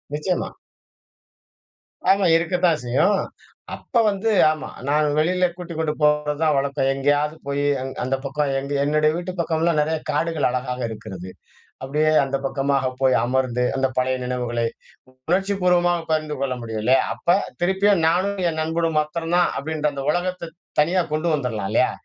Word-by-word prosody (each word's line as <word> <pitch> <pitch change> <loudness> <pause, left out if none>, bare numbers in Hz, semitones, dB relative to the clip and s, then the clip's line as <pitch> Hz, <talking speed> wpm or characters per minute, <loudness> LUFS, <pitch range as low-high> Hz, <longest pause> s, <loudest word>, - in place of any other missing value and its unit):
நிச்சயமா. 180 +4 -1 1.6
ஆமா 195 0 +4
இருக்கத்தான் 175 -1 +1
செய்யும். 155 +12 +2 0.5
அப்ப 265 - -16
வந்து, 200 +2 -1 0.2
ஆமா. 155 -2 -5 0.2
நான் 150 +1 +2
வெளியில 180 +4 +2
கூட்டிக்கொண்டு 160 -3 -3
போவது 150 0 +2
தான் 155 -2 +3
வழக்கம். 140 -1 0
எங்கேயாவது 145 +3 +1
போய் 140 0 -1 0.4
அந்த 130 +2 0
பக்கம், 145 +1 -1
எங்க 140 +1 -5
என்னுடைய 155 +1 +2
வீட்டு 175 +2 -4
பக்கம்லாம் 165 -1 +1
நெறைய 160 +1 0
காடுகள் 155 -1 0
அழகாக 125 0 -3
இருக்கிறது 95 -4 -8 0.5
அப்படியே 150 +3 +1
அந்த 135 0 -1
பக்கமாக 135 -1 0 0.2
போய் 130 -1 +4
அமர்ந்து 125 -1 0
அந்த 135 0 +1
பழைய 130 0 +1
நினைவுகளை 120 -2 -2 0.7
உணர்ச்சிபூர்வமாக 180 -2 +2
பகிர்ந்து 155 -1 0
கொள்ள 135 -2 -1
முடியும் 110 -2 -4
இல்லயா? 130 +2 +4
அப்ப - - -18 0.3
திருப்பியும் 190 +1 +2
நானும் 190 +5 +1
என் 160 -1 -3
நண்பனும் 165 0 -1
மாத்திரம் 165 +3 -2
தான் 175 - +4
அப்படின்ற 155 +1 -2
அந்த 140 -1 -5
உலகத்தை 175 0 -2 0.3
தனியா 175 +5 +2
கொண்டு 155 +3 0
வந்துறலாம் 115 -8 -2
இல்லையா? 125 - +3
150 Hz, 140 wpm, -22 LUFS, 135-170 Hz, 1.6 s, ஆமா